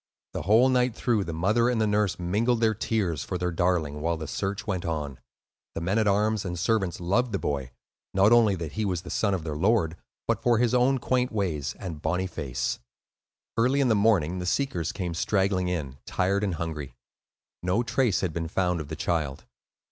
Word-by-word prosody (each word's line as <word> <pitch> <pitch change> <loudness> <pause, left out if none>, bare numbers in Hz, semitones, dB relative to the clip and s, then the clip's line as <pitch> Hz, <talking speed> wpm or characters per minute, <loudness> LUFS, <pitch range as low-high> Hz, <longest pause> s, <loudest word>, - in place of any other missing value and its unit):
The - - -3
whole 110 +7 +5
night 125 -2 +2
through, 115 -6 +1
the 85 - -4
mother 105 +9 +2
and 120 -2 0
the 110 - +3
nurse 105 -3 +1
mingled 110 +7 +1
their 110 -1 +3
tears 95 - -1
for 90 - -3
their 90 0 -1
darling, 80 -4 0
while 85 +1 0
the 80 - -5
search 100 +6 -3
went 95 -4 -2
on. 75 -6 -3 0.6
The - - -3
men 95 +6 +1
at 110 - +2
arms 105 +1 +2
and 90 -2 -4
servants 95 0 0
loved 100 +7 +1
the - - +2
boy, 70 -7 -2 0.4
not 100 +3 +4
only 115 -4 +5
that 85 -4 -5
he 110 - -2
was 90 -4 -1
the 90 - -8
son 100 -3 +1
of 85 - -4
their 75 -2 -4
lord 90 -1 +2 0.3
but - - +1
for 120 -2 +3
his 120 0 +2
own 125 +2 +4
quaint 125 0 0
ways 85 - -2
and 85 -6 -6
bonny 90 +2 0
face. 70 -8 -3 0.8
Early 125 +5 +2
in 135 -3 +3
the 110 - +4
morning 95 -5 +2
the 90 - -4
seekers 90 - 0
came 90 -3 -4
straggling 95 +1 +1
in, 75 -7 -3
tired 100 +2 +1
and 95 -4 0
hungry; 80 -4 -5 0.7
no 90 +7 +1
trace 120 -4 +1
had 90 -4 -1
been 85 0 -2
found 90 0 0
of 75 - -8
the - - -5
child. 75 -6 -2
95 Hz, 205 wpm, -27 LUFS, 85-110 Hz, 0.8 s, whole